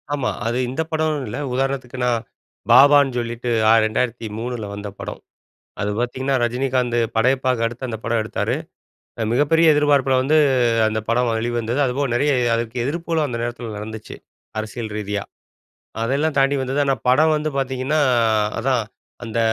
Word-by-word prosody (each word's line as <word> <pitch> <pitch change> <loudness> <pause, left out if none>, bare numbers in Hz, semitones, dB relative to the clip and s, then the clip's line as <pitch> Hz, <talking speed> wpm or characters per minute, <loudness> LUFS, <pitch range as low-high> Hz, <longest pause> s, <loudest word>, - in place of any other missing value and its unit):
ஆமா. 135 -3 -1 0.2
அது 120 +2 -1
இந்த 135 +5 -2
படம்னு 155 -3 0
இல்ல. 125 - -5 0.2
உதாரணத்துக்குனா, 130 -2 -1 0.6
பாபான்னு 140 -2 +7
சொல்லிட்டு, 120 +1 -4 0.2
அ - - +7
2003ல 115 0 -3
வந்த 100 0 -6
படம். - - -6 0.6
அது 105 - -1
பாத்தீங்கன்னா, 130 +3 -1
ரஜினிகாந்து 125 0 0 0.2
படையப்பாக்கு 125 0 +2
அடுத்து 120 +3 -5
அந்த 110 -2 -4
படம் 115 0 +1
எடுத்தாரு. 105 - -2 0.6
அ - - 0
மிகப்பெரிய 155 +4 +4
எதிர்பார்ப்பில 140 -3 +3
வந்து 150 +4 +2 0.5
அந்த 110 0 -2
படம் 120 +1 +2
வெளிவந்தது. 120 +2 -1
அதுபோக 135 +3 -1
நெறைய 145 +4 +2 0.2
அதுக்கு 115 +1 -3
எதிர்ப்புகளும் 165 +1 -1
அந்த 120 - -4
நேரத்தில 120 -2 -5
நடந்துச்சு. 110 +1 -8 0.4
அரசியல் 110 +1 -5
ரீதியா. 105 -1 -3 0.8
அதெல்லா 140 +6 +1
தாண்டி 135 +1 +3
வந்தது, 135 +3 -1
ஆனா 135 -1 +2
படம் 155 +5 +4
வந்து 155 +1 -2
பாத்தீங்கன்னா 130 +3 0 0.6
அதான் 125 -1 +1 0.4
அந்த 115 0 -4
125 Hz, 140 wpm, -21 LUFS, 115-140 Hz, 0.8 s, பாபான்னு